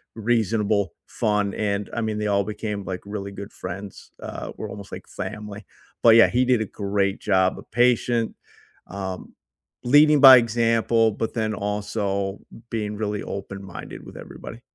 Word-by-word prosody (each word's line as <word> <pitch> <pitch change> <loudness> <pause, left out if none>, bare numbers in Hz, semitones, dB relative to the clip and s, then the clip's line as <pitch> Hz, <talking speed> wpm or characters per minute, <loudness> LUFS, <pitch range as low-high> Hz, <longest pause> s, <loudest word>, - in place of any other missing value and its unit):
reasonable, 110 -3 +1
fun, 105 -2 0
and 105 -1 -2
I 115 - -2
mean, 110 -1 -2
they 105 0 -1
all 100 -1 +2
became, 105 -1 -4
like, 95 -1 -5
really 100 -1 -5
good 100 +1 -8
friends, 95 +2 -8
uh, - - -6
we're - - -5
almost, 100 -1 -9
like, - - -8
family 105 -1 -7 0.4
but 115 -1 +8
yeah, 115 - +8
he 125 +2 +1
did 125 -3 +3
a - - 0
great 100 0 -1
job, 95 -2 +2
uh, - - -8
patient, 120 -1 +2 0.5
um, 95 -1 -6 0.5
leading 145 +3 +6
by 130 -2 +11
example, 115 -1 +2
but 110 +2 -3
then 110 -1 -1
also 100 -1 -2 0.3
being 105 -2 -2
really 105 -1 -2
open-minded 100 -1 -7
with - - -11
everybody. 115 - -10
105 Hz, 155 wpm, -24 LUFS, 100-115 Hz, 0.5 s, by